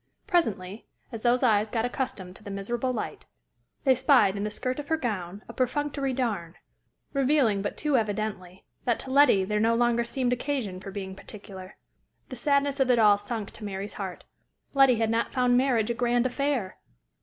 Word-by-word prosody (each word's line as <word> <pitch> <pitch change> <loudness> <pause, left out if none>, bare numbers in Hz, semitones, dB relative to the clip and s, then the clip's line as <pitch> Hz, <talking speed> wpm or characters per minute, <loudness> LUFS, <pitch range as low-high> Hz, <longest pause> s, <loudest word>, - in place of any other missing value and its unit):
Presently, 215 - -1 0.2
as 225 - -6
those 245 +2 +2
eyes 215 -3 +3
got 225 +1 0
accustomed 205 -8 -4
to - - -15
the 205 - -8
miserable 235 +6 -2
light, 235 - -5 0.6
they 265 -2 +5
spied 255 -6 +4
in 200 - -3
the 210 - -1
skirt 255 +5 -3
of 290 - -6
her 320 - +1
gown 205 - -4
a - - -9
perfunctory 275 +1 -1
darn, 210 -10 -2 0.6
revealing 270 -7 +2
but 205 - -4
too 295 -3 +1
evidently 205 -4 -3 0.2
that 240 -2 +1
to 260 - -7
Letty 260 -9 +5
there 210 +2 0
no 225 +2 +3
longer 240 0 +2
seemed 250 +1 0
occasion 245 -8 -3
for 190 - -8
being 190 -1 -6
particular. 195 -1 -11 0.5
The 255 - -6
sadness 280 +2 +1
of 265 -1 +2
it 250 - +5
all 210 -2 +5
sunk 205 0 -4
to 215 - -11
Mary's 200 0 -5
heart: 190 -2 -6 0.5
Letty 270 -3 +6
had 225 0 0
not 230 +1 0
found 250 -1 +2
marriage 245 -3 +2
a - - 0
grand 240 0 +1
affair! 255 -6 -1
235 Hz, 185 wpm, -27 LUFS, 205-260 Hz, 0.6 s, Letty